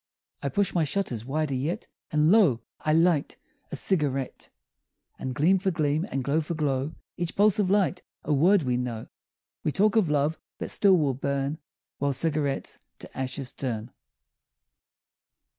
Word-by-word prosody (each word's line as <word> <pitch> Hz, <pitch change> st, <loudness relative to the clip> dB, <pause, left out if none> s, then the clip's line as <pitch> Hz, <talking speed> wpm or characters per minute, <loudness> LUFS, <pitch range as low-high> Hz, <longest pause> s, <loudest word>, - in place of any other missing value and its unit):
I 140 Hz, -, -1 dB
push 200 Hz, +8 st, +1 dB
my 170 Hz, -, +2 dB
shutters 145 Hz, -, -2 dB
wider 150 Hz, +1 st, -1 dB
yet, 140 Hz, +7 st, -2 dB, 0.3 s
And 150 Hz, +2 st, +3 dB
lo! 185 Hz, -, +5 dB, 0.2 s
I 155 Hz, -, 0 dB
light 165 Hz, -2 st, +2 dB, 0.3 s
a -, -, -2 dB
cigarette; 140 Hz, -8 st, 0 dB, 0.7 s
And 130 Hz, -1 st, -4 dB
gleam 175 Hz, +7 st, +4 dB
for 190 Hz, +1 st, 0 dB
gleam, 155 Hz, 0 st, 0 dB
and 135 Hz, -, -2 dB
glow 145 Hz, +5 st, +1 dB
for 165 Hz, +2 st, -4 dB
glow, 145 Hz, 0 st, -1 dB, 0.2 s
Each 175 Hz, -1 st, -3 dB
pulse 210 Hz, +1 st, +4 dB
of 195 Hz, -3 st, +2 dB
light 200 Hz, -1 st, +2 dB, 0.2 s
a 150 Hz, -, 0 dB
word 175 Hz, +6 st, +4 dB
we 125 Hz, -2 st, 0 dB
know, 120 Hz, -3 st, -4 dB, 0.5 s
We 150 Hz, -, +1 dB
talk 205 Hz, +6 st, +2 dB
of 210 Hz, -8 st, +3 dB
love 150 Hz, +2 st, +1 dB, 0.2 s
that -, -, -4 dB
still 195 Hz, -3 st, +4 dB
will 145 Hz, -5 st, +1 dB
burn 140 Hz, +3 st, -2 dB, 0.4 s
While 140 Hz, 0 st, +1 dB
cigarettes 145 Hz, 0 st, -1 dB, 0.2 s
to -, -, -12 dB
ashes 130 Hz, 0 st, -4 dB
turn. 120 Hz, -3 st, -4 dB
150 Hz, 160 wpm, -27 LUFS, 135-175 Hz, 0.7 s, lo